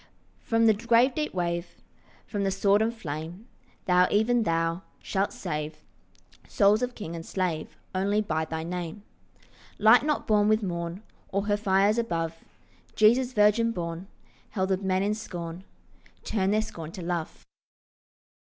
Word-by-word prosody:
From 230 Hz, 0 st, +1 dB
the 220 Hz, -, +6 dB
grave 235 Hz, +4 st, +3 dB
deep 300 Hz, +1 st, -2 dB
wave, 175 Hz, -1 st, -3 dB, 0.5 s
From 205 Hz, -2 st, -3 dB
the 195 Hz, -, +1 dB
sword 200 Hz, +2 st, +3 dB
and 225 Hz, +1 st, +2 dB
flame, 170 Hz, -, -7 dB, 0.4 s
Thou, 180 Hz, 0 st, +4 dB
even 230 Hz, +3 st, +2 dB
thou, 165 Hz, -2 st, 0 dB, 0.2 s
shalt 195 Hz, +1 st, -1 dB
save 150 Hz, -3 st, -5 dB, 0.6 s
Souls 210 Hz, +1 st, +3 dB
of 250 Hz, 0 st, -2 dB
king 170 Hz, -5 st, -6 dB
and 165 Hz, -, -6 dB
slave 170 Hz, -4 st, -3 dB, 0.2 s
Only 200 Hz, +3 st, +1 dB
by 160 Hz, -6 st, -1 dB
thy 160 Hz, 0 st, -4 dB
Name. 175 Hz, +3 st, -5 dB, 0.7 s
Light 220 Hz, +4 st, +7 dB
not 300 Hz, 0 st, -1 dB
born 210 Hz, -1 st, +3 dB
with 215 Hz, 0 st, +3 dB
morn 170 Hz, +1 st, -4 dB, 0.3 s
Or 200 Hz, +1 st, -1 dB
her 205 Hz, -1 st, +2 dB
fires 205 Hz, +2 st, +2 dB
above, 165 Hz, -7 st, -3 dB, 0.5 s
Jesus 245 Hz, +4 st, +4 dB
virgin 210 Hz, +1 st, +4 dB
born, 170 Hz, -1 st, -5 dB, 0.4 s
Held 190 Hz, -2 st, -1 dB
of 190 Hz, 0 st, +1 dB
men 190 Hz, 0 st, +1 dB
in 205 Hz, +1 st, +1 dB
scorn, 175 Hz, -4 st, -7 dB, 0.6 s
Turn 195 Hz, -3 st, 0 dB
their 215 Hz, +1 st, +2 dB
scorn 165 Hz, -7 st, -8 dB
to 180 Hz, -, -7 dB
love. 170 Hz, -2 st, -4 dB
195 Hz, 150 wpm, -27 LUFS, 170-215 Hz, 0.7 s, Light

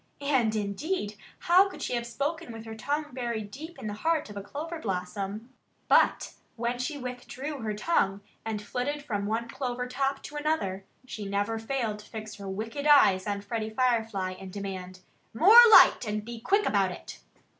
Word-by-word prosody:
And 245 Hz, -6 st, +2 dB
indeed, 210 Hz, -, -2 dB, 0.3 s
how 370 Hz, +3 st, +5 dB
could 375 Hz, -, -8 dB
she -, -, -2 dB
have 235 Hz, -1 st, -2 dB
spoken 290 Hz, +5 st, -3 dB
with 225 Hz, 0 st, -9 dB
her 225 Hz, -, -7 dB
tongue 290 Hz, +7 st, -3 dB
buried 235 Hz, -5 st, -3 dB
deep 320 Hz, -, -9 dB
in -, -, -9 dB
the 210 Hz, -, -3 dB
heart 310 Hz, +2 st, -1 dB
of -, -, -10 dB
a 200 Hz, -, -4 dB
clover 305 Hz, -, -6 dB
blossom? 200 Hz, +4 st, -4 dB, 0.3 s
But -, -, +3 dB, 0.2 s
when 240 Hz, +1 st, -2 dB
she 270 Hz, +4 st, -3 dB
withdrew 255 Hz, +3 st, -6 dB
her 215 Hz, -3 st, -3 dB
tongue 205 Hz, -, +1 dB, 0.2 s
and 215 Hz, -2 st, -4 dB
flitted 285 Hz, +6 st, -3 dB
from 205 Hz, -6 st, -2 dB
one 225 Hz, +2 st, -1 dB
clover 250 Hz, -1 st, -3 dB
top 270 Hz, +2 st, -1 dB
to 295 Hz, -, -7 dB
another, 245 Hz, -12 st, -1 dB, 0.2 s
she 215 Hz, -4 st, -6 dB
never 205 Hz, +3 st, -1 dB
failed 225 Hz, -3 st, -2 dB
to 210 Hz, -, -14 dB
fix 215 Hz, -1 st, -7 dB
her 200 Hz, -1 st, -7 dB
wicked 225 Hz, +9 st, -4 dB
eyes 200 Hz, -10 st, +6 dB
on 200 Hz, -1 st, -2 dB
Freddie 215 Hz, +1 st, -3 dB
Firefly 225 Hz, -5 st, 0 dB
and 190 Hz, -1 st, -9 dB
demand 185 Hz, -2 st, -6 dB, 0.3 s
"more 415 Hz, -, +9 dB
light 440 Hz, -, +8 dB
and 210 Hz, 0 st, -2 dB
be 235 Hz, -1 st, -7 dB
quick 405 Hz, -, +2 dB
about 195 Hz, -3 st, +2 dB
it!" 180 Hz, -, -9 dB
225 Hz, 180 wpm, -28 LUFS, 205-280 Hz, 0.3 s, more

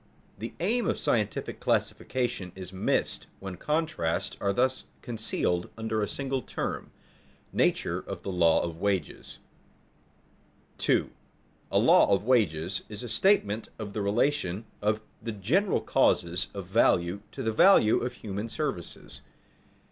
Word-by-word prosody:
The 115 Hz, +3 st, -6 dB
aim 220 Hz, +5 st, +1 dB
of -, -, +1 dB
scientific 105 Hz, -3 st, -1 dB
classification 120 Hz, -8 st, -1 dB
is 95 Hz, -1 st, -8 dB
missed 95 Hz, -, 0 dB
when 95 Hz, -2 st, -6 dB
contrasts 100 Hz, -, -1 dB
are 100 Hz, -, +2 dB
thus 130 Hz, +5 st, +1 dB, 0.2 s
concealed 110 Hz, -6 st, -1 dB
under 110 Hz, -1 st, -1 dB
a 105 Hz, -, 0 dB
single 135 Hz, -1 st, -2 dB
term. -, -, -4 dB, 0.6 s
[Sidenote: -, -, -34 dB
Nature -, -, +1 dB
of -, -, -6 dB
the 100 Hz, -, -3 dB
law 85 Hz, -3 st, +4 dB
of 85 Hz, -1 st, -4 dB
wages] 95 Hz, -6 st, -2 dB, 1.4 s
2. -, -, +2 dB, 0.6 s
_A -, -, +4 dB
law -, -, +6 dB
of 100 Hz, -, +3 dB
wages 100 Hz, -8 st, +1 dB
is 105 Hz, +2 st, -7 dB
a -, -, -5 dB
statement 115 Hz, -, +2 dB
of 105 Hz, -2 st, -6 dB
the 105 Hz, -, -2 dB
relation 105 Hz, -1 st, 0 dB, 0.2 s
of 105 Hz, +1 st, +1 dB, 0.2 s
the 115 Hz, -, -4 dB
general 155 Hz, -, +1 dB
causes 85 Hz, +1 st, +2 dB
of 100 Hz, -2 st, -5 dB
value 90 Hz, -1 st, +2 dB
to -, -, -6 dB
the 110 Hz, -, 0 dB
value 110 Hz, -, +6 dB
of 125 Hz, +1 st, -3 dB
human 105 Hz, -1 st, -5 dB
services. -, -, -4 dB
105 Hz, 140 wpm, -28 LUFS, 95-120 Hz, 1.4 s, law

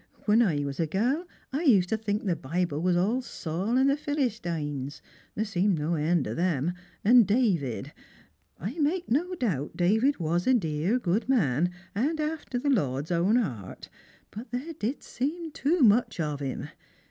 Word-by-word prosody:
" -, -, -28 dB
When 215 Hz, +2 st, +5 dB
I 155 Hz, -10 st, +2 dB
was 140 Hz, 0 st, -5 dB
a 165 Hz, -, +1 dB
gal, 250 Hz, -, 0 dB, 0.3 s
I 285 Hz, -, 0 dB
used 205 Hz, -, +4 dB
to 220 Hz, -, +1 dB
think 210 Hz, -1 st, -2 dB
the 180 Hz, -4 st, +1 dB
Bible 160 Hz, +1 st, -2 dB
was 180 Hz, 0 st, +2 dB
all 215 Hz, +8 st, +1 dB
Saul 195 Hz, +1 st, -2 dB
and 265 Hz, +1 st, +4 dB
the 275 Hz, -, +3 dB
Philistings 175 Hz, -, -3 dB, 0.2 s
— -, -, -31 dB
there 215 Hz, -, 0 dB
seemed 195 Hz, -2 st, +1 dB
no 155 Hz, +3 st, -1 dB
end 160 Hz, -1 st, +1 dB
ot -, -, -4 dB
'em 170 Hz, -2 st, +1 dB, 0.2 s
— -, -, -32 dB
and 235 Hz, -1 st, +7 dB
David. 175 Hz, -, 0 dB, 0.7 s
I 225 Hz, -, -5 dB
make 330 Hz, +1 st, 0 dB
no 350 Hz, +8 st, +1 dB
doubt 175 Hz, -, -2 dB
David 220 Hz, +11 st, +3 dB
was 170 Hz, +1 st, -1 dB
a 260 Hz, -, +5 dB
dear 165 Hz, +2 st, 0 dB
good 215 Hz, +2 st, -1 dB
man, 175 Hz, -, +2 dB, 0.2 s
and 290 Hz, +10 st, 0 dB
after 305 Hz, -4 st, -3 dB
the 280 Hz, +3 st, +1 dB
Lord's 145 Hz, -, 0 dB
own 175 Hz, +6 st, +3 dB
heart; 120 Hz, -, -3 dB, 0.4 s
but 225 Hz, +5 st, -8 dB
there 255 Hz, +8 st, -4 dB
did 270 Hz, -2 st, -3 dB
seem 315 Hz, +6 st, -3 dB
too 310 Hz, +4 st, 0 dB
much 230 Hz, -4 st, +4 dB
of 150 Hz, -3 st, -2 dB
him. 135 Hz, -2 st, -4 dB
205 Hz, 180 wpm, -27 LUFS, 160-255 Hz, 0.7 s, and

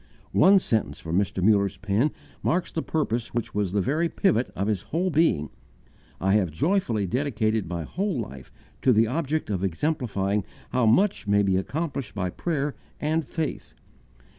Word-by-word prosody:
One 195 Hz, +1 st, +7 dB
sentence 110 Hz, -, 0 dB
from 80 Hz, +3 st, 0 dB
Mr. 95 Hz, -2 st, -1 dB
Muller's 100 Hz, -2 st, +3 dB
pen 100 Hz, +8 st, +1 dB, 0.3 s
marks 180 Hz, +2 st, 0 dB
the 160 Hz, -, -2 dB
purpose 120 Hz, -9 st, -2 dB
which 120 Hz, -, -2 dB
was 100 Hz, -3 st, 0 dB
the 100 Hz, +1 st, +1 dB
very 155 Hz, -, +1 dB
pivot 165 Hz, -, +1 dB
of 95 Hz, -, -1 dB
his 105 Hz, -4 st, 0 dB
whole 180 Hz, +4 st, 0 dB
being: 150 Hz, -, +2 dB, 0.7 s
"I 95 Hz, +2 st, +2 dB
have 100 Hz, -4 st, +3 dB
joyfully 115 Hz, -, 0 dB
dedicated 110 Hz, -2 st, 0 dB
my 85 Hz, -2 st, -3 dB
whole 190 Hz, -, -2 dB
life 70 Hz, -, -7 dB, 0.3 s
to 130 Hz, -, +5 dB
the 110 Hz, +1 st, +5 dB
object 150 Hz, +1 st, -1 dB
of 95 Hz, -2 st, -1 dB
exemplifying 100 Hz, -, 0 dB, 0.3 s
how 125 Hz, -2 st, +2 dB
much 155 Hz, -, +3 dB
may 100 Hz, 0 st, +4 dB
be 95 Hz, -1 st, +2 dB
accomplished 135 Hz, -, -3 dB
by 90 Hz, -3 st, -1 dB
prayer 150 Hz, -, -2 dB, 0.3 s
and 160 Hz, +2 st, 0 dB
faith." 155 Hz, +1 st, -4 dB
110 Hz, 165 wpm, -26 LUFS, 100-155 Hz, 0.7 s, One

